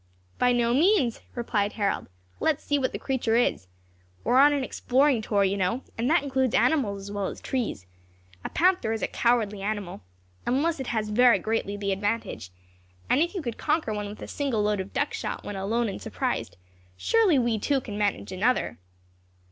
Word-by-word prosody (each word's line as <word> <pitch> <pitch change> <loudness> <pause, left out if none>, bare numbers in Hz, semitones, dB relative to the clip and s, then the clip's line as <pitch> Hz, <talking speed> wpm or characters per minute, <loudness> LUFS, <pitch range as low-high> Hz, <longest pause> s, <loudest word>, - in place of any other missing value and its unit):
"By 250 - +4
no 240 -1 +2
means," 300 - +3
replied 215 -4 -1
Harold. 205 -3 -1 0.3
"Let 315 - +2
us - - -23
see 290 0 +1
what 260 - 0
the - - -4
creature 250 -4 0
is. 230 - +1 0.6
We - - -1
are 255 - +6
on 290 +2 +7
an 285 -2 0
exploring 260 -1 +2
tour, 205 -2 +1
you 195 +1 +1
know, 195 +7 0
and 235 +3 -1
that 320 -2 +3
includes 265 -3 0
animals 215 -11 +2
as 200 +1 -8
well 200 -2 -2
as - - -6
trees. 230 - -3 0.6
A - - -4
panther 350 -10 +2
is 225 - -3
a - - +2
cowardly 220 -4 +1
animal, 200 - -4 0.4
unless 295 +5 0
it 265 - -4
has 215 -2 -1
very 240 +1 +5
greatly 205 0 -2
the 200 -1 -2
advantage; 205 - -2 0.6
and 280 - +4
if 345 +4 0
you 365 - -3
could 235 -4 -5
conquer 305 -7 0
one 210 -1 -4
with 210 - -9
a - - -7
single 265 -7 -1
load 210 -1 +1
of 190 +1 -5
duck - - -1
shot - - -4
when 205 - -6
alone 225 +5 0
and 195 - -5
surprised, - - -3 0.4
surely 425 - +3
we 235 -3 +1
two 280 +5 +1
can 215 -5 -7
manage 205 -2 -1
another." 210 - 0
230 Hz, 195 wpm, -26 LUFS, 205-270 Hz, 0.6 s, on